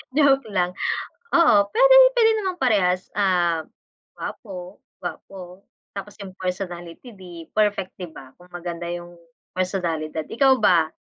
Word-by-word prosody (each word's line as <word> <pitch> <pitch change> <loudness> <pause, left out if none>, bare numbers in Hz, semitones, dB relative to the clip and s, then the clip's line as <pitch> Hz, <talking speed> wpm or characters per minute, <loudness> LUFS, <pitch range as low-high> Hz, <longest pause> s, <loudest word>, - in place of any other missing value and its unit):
Joke 275 -4 +4
lang, 180 -3 0 0.6
oo, 335 -9 +6 0.2
pwedeng - - +7
piliin 450 -2 +4
namang 375 -3 -3
parehas, 185 -7 +2
num, 175 -5 +1 0.5
gwapo, 185 -3 -8 0.2
gwapo, 185 0 -9 0.3
tapos 200 0 -7
yung 190 -1 -10
personality 180 +3 -6
di 175 -4 -11
perfect, 205 -3 0
di 180 -3 -7
ba? 135 -4 -13
Kung 180 0 -19
maganda 175 -1 -6
yung 175 0 -7 0.4
personalidad. 165 -4 -2
Ikaw 270 +3 +3
ba? 170 -5 +5
185 Hz, 125 wpm, -23 LUFS, 175-215 Hz, 0.6 s, pwedeng